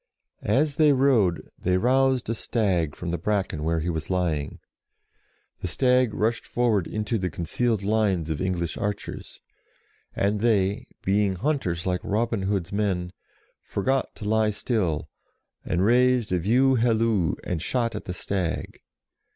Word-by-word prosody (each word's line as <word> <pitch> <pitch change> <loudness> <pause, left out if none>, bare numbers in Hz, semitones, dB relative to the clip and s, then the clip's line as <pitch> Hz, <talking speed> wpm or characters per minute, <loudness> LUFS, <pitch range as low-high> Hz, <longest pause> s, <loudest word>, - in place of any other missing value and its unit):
As 150 -2 +2
they 150 -2 +5
rode 125 -10 +2
they 90 0 +1
roused 130 +3 +2
a 115 - 0
stag 95 - 0
from 85 -1 -4
the 85 - -2
bracken 95 -4 -1
where 80 0 0
he 85 - -2
was 80 -1 -4
lying: 85 -6 -1 1.0
the - - -3
stag 125 +4 +2
rushed 115 +2 0
forward 115 -7 +1
into 110 +1 -2
the 90 -1 -1
concealed 100 +6 -1
lines 100 -6 +1
of 75 - -3
English 90 -3 -2
archers, 105 0 -5 0.7
and 100 +1 +1
they, 100 -3 +1 0.2
being 100 0 +2
hunters 95 - -1
like 90 -1 0
Robin 115 0 0
Hood's 95 -2 -1
men, 95 -4 -1 0.5
forgot 130 +6 -1
to 105 - -8
lie 110 0 +2
still, 100 - -1 0.6
and 90 +2 0
raised 125 -1 +3
a 90 - +2
view 125 +9 +3
halloo, 115 -7 +2
and 85 -3 -3
shot 115 +5 -1
at - - -6
the 90 - -4
stag. 90 -3 -3
100 Hz, 145 wpm, -25 LUFS, 90-120 Hz, 1.0 s, they